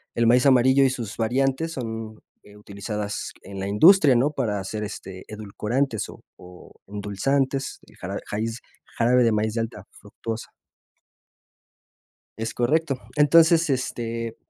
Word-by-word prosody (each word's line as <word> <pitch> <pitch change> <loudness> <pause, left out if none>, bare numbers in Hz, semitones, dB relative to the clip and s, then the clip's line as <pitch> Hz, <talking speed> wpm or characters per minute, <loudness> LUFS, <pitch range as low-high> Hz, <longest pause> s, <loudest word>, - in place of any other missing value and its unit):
El 115 - +2
maíz 125 +3 +4
amarillo 130 0 +5
y 135 - +4
sus 115 -5 -5
variantes 135 +7 0
son, 110 -3 -6 0.2
eh, 105 0 -16
utilizadas 105 0 -5
en 100 0 -8
la 95 - -3
industria, 155 - +6
¿no? 135 +5 +2
Para 105 -8 -2
hacer, 105 +3 -5
este, 95 -2 -8
edulcorantes 110 +4 -2
o - - -13
o 90 0 -14
endulzantes, 130 +7 -1
el - - -19
jarabe - - -5
jaiz 115 +3 -3 0.4
jarabe 125 +2 +4
de 115 - +3
maíz 105 0 0
de 115 - 0
alta 110 -3 -6
fructuosa. 110 +2 -7 1.9
Es 115 0 -4
correcto. 145 +4 +1 0.2
Entonces, 160 +2 +5
este, 115 -3 -3
115 Hz, 135 wpm, -24 LUFS, 105-135 Hz, 1.9 s, industria